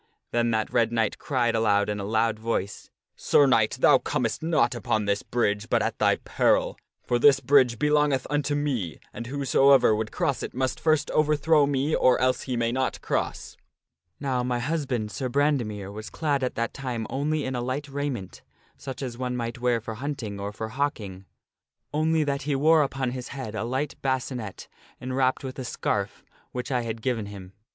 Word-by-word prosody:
Then 120 Hz, 0 st, +1 dB
that 110 Hz, -1 st, -1 dB
Red 115 Hz, -1 st, +3 dB
Knight 115 Hz, -2 st, 0 dB
cried 120 Hz, -5 st, 0 dB
out 105 Hz, -2 st, +2 dB
in 105 Hz, -1 st, -2 dB
a -, -, -4 dB
loud 110 Hz, +1 st, +1 dB
voice, 110 Hz, -3 st, -3 dB
' -, -, -65 dB
Sir 145 Hz, -, +4 dB
Knight, 115 Hz, -2 st, +3 dB
thou 140 Hz, -3 st, +6 dB
comest 115 Hz, -2 st, -2 dB
not 160 Hz, -4 st, +2 dB
upon 110 Hz, -2 st, -1 dB
this 100 Hz, 0 st, 0 dB
bridge 105 Hz, -3 st, -1 dB
but -, -, +2 dB
at -, -, -2 dB
thy -, -, +4 dB
peril; -, -, +1 dB, 0.3 s
for 120 Hz, -, 0 dB
this 135 Hz, +1 st, +6 dB
bridge 130 Hz, -5 st, +4 dB
belongeth 150 Hz, -2 st, +2 dB
unto 145 Hz, 0 st, 0 dB
me, 130 Hz, -, -2 dB
and 120 Hz, -, -6 dB
whosoever 135 Hz, -2 st, +4 dB
would 110 Hz, 0 st, -3 dB
cross 160 Hz, -7 st, -1 dB
it -, -, -6 dB
must 130 Hz, 0 st, -1 dB
first 155 Hz, -2 st, +1 dB
overthrow 155 Hz, 0 st, +3 dB
me 140 Hz, +2 st, 0 dB
or 130 Hz, -, +4 dB
else 130 Hz, 0 st, +2 dB
he 125 Hz, -2 st, -3 dB
may 115 Hz, 0 st, +1 dB
not 130 Hz, +1 st, -1 dB
cross.' -, -, -3 dB, 0.3 s
" 85 Hz, +2 st, -53 dB
Now, 130 Hz, -3 st, -1 dB
my 125 Hz, 0 st, -1 dB
husband, 125 Hz, -5 st, -2 dB
Sir 130 Hz, +2 st, -3 dB
Brandemere, 120 Hz, -8 st, 0 dB
was 110 Hz, +1 st, -7 dB
clad 145 Hz, -4 st, -1 dB
at 125 Hz, -, -2 dB
that 115 Hz, 0 st, -2 dB
time 125 Hz, -5 st, -4 dB
only 150 Hz, +2 st, -1 dB
in 130 Hz, -, -3 dB
a 120 Hz, -, -2 dB
light 130 Hz, +4 st, -3 dB
raiment 140 Hz, -8 st, -4 dB, 0.4 s
such 135 Hz, 0 st, -7 dB
as 120 Hz, -2 st, -5 dB
one 125 Hz, -1 st, -2 dB
might 115 Hz, 0 st, -4 dB
wear 120 Hz, -1 st, +2 dB
for 115 Hz, 0 st, -6 dB
hunting 115 Hz, -5 st, -5 dB
or 100 Hz, +1 st, -4 dB
for 110 Hz, +1 st, -5 dB
hawking; 110 Hz, -8 st, -3 dB, 0.7 s
only 155 Hz, +1 st, +2 dB
that 140 Hz, -1 st, -1 dB
he 145 Hz, 0 st, -1 dB
wore 155 Hz, +3 st, +5 dB
upon 135 Hz, -3 st, -1 dB
his 125 Hz, -1 st, -6 dB
head 130 Hz, -6 st, -6 dB
a 110 Hz, -1 st, -3 dB
light 130 Hz, +5 st, -2 dB
bascinet 130 Hz, -6 st, -3 dB, 0.3 s
enwrapped 130 Hz, +1 st, 0 dB
with 130 Hz, 0 st, -6 dB
a -, -, -3 dB
scarf 120 Hz, -, -2 dB, 0.3 s
which 125 Hz, +3 st, -4 dB
I 125 Hz, -2 st, +1 dB
had 115 Hz, -1 st, -5 dB
given 115 Hz, -5 st, -1 dB
him. 95 Hz, -2 st, -10 dB
125 Hz, 190 wpm, -26 LUFS, 110-140 Hz, 0.7 s, thou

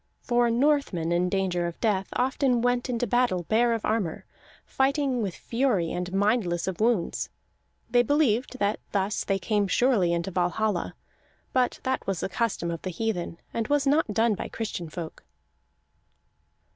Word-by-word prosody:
For 240 Hz, -1 st, +2 dB
Northmen, 235 Hz, -, +1 dB
in 175 Hz, +1 st, +2 dB
danger 180 Hz, -2 st, 0 dB
of 170 Hz, -, -7 dB
death, 200 Hz, -4 st, +1 dB
often 255 Hz, -1 st, +1 dB
went 245 Hz, +1 st, +1 dB
into 245 Hz, 0 st, 0 dB
battle 240 Hz, -6 st, +1 dB
bare 230 Hz, +6 st, +2 dB
of 225 Hz, -, -2 dB
armor, 210 Hz, -7 st, -1 dB, 0.4 s
fighting 270 Hz, -2 st, +1 dB
with 195 Hz, -5 st, -3 dB
fury 230 Hz, -9 st, 0 dB
and 180 Hz, 0 st, -3 dB
mindless 195 Hz, -3 st, +1 dB
of 190 Hz, -3 st, -3 dB
wounds. 220 Hz, -5 st, +1 dB, 0.6 s
They 245 Hz, -, +4 dB
believed 255 Hz, -2 st, +1 dB
that 205 Hz, -2 st, 0 dB
thus 200 Hz, +1 st, 0 dB
they 195 Hz, -, 0 dB
came 205 Hz, +1 st, 0 dB
surely 215 Hz, -5 st, +3 dB
into 170 Hz, +2 st, -1 dB
Valhalla; 180 Hz, +2 st, 0 dB, 0.6 s
but 255 Hz, -1 st, +1 dB
that 260 Hz, 0 st, -2 dB
was 195 Hz, -4 st, -1 dB
a -, -, -1 dB
custom 210 Hz, -7 st, -1 dB
of 165 Hz, -, -5 dB
the 185 Hz, -, -4 dB
heathen, 180 Hz, -3 st, -3 dB, 0.2 s
and 230 Hz, -1 st, -1 dB
was 290 Hz, -1 st, +2 dB
not 285 Hz, -4 st, +2 dB
done 225 Hz, +2 st, +2 dB
by -, -, -4 dB
Christian 195 Hz, -7 st, -5 dB
folk. 165 Hz, 0 st, -7 dB
215 Hz, 160 wpm, -26 LUFS, 180-245 Hz, 0.6 s, They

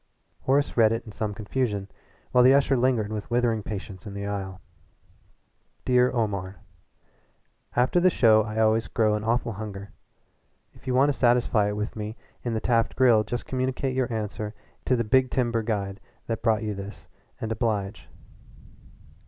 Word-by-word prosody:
Horace 140 Hz, +2 st, +2 dB
read 110 Hz, -2 st, +5 dB
it 115 Hz, +1 st, -2 dB
in 110 Hz, -, -9 dB
some 105 Hz, +1 st, -3 dB
confusion, 105 Hz, -2 st, -2 dB, 0.4 s
while 125 Hz, -, +5 dB
the 130 Hz, +2 st, +7 dB
usher 140 Hz, -1 st, +3 dB
lingered 120 Hz, -4 st, +1 dB
with 105 Hz, 0 st, -5 dB
withering 120 Hz, -2 st, +1 dB
patience 100 Hz, -1 st, -7 dB
in 100 Hz, -, -7 dB
the 100 Hz, 0 st, -4 dB
aisle. 95 Hz, -2 st, -4 dB, 1.3 s
"Dear 125 Hz, 0 st, +4 dB
Omar: 100 Hz, -5 st, -2 dB, 1.2 s
After 125 Hz, +8 st, +3 dB
the 185 Hz, +1 st, +5 dB
show 110 Hz, -9 st, +5 dB
I 110 Hz, 0 st, -5 dB
always 110 Hz, 0 st, +2 dB
grow 110 Hz, -2 st, +1 dB
an 105 Hz, 0 st, -2 dB
awful 115 Hz, +1 st, 0 dB
hunger. 100 Hz, -2 st, -7 dB, 0.8 s
If -, -, -19 dB
you 125 Hz, -, 0 dB
want 135 Hz, +3 st, +4 dB
to -, -, +2 dB
satisfy 120 Hz, -5 st, +2 dB
it -, -, -4 dB
for -, -, -11 dB
me 105 Hz, +2 st, -5 dB, 0.3 s
in 120 Hz, -2 st, -2 dB
the -, -, 0 dB
Taft 115 Hz, 0 st, +1 dB
Grill 120 Hz, -4 st, +5 dB
just 120 Hz, +2 st, -4 dB
communicate 130 Hz, 0 st, -2 dB
your 130 Hz, -1 st, 0 dB
answer 105 Hz, -1 st, -4 dB, 0.3 s
to 130 Hz, -, +3 dB
the 120 Hz, -, 0 dB
big 130 Hz, +3 st, +3 dB
timber 120 Hz, -3 st, 0 dB
guide 100 Hz, -3 st, -3 dB, 0.3 s
that 115 Hz, -1 st, -3 dB
brought 110 Hz, -1 st, +2 dB
this 105 Hz, -1 st, -6 dB, 0.3 s
and 110 Hz, -, -4 dB
oblige. 110 Hz, -3 st, -2 dB
110 Hz, 165 wpm, -26 LUFS, 105-125 Hz, 1.3 s, the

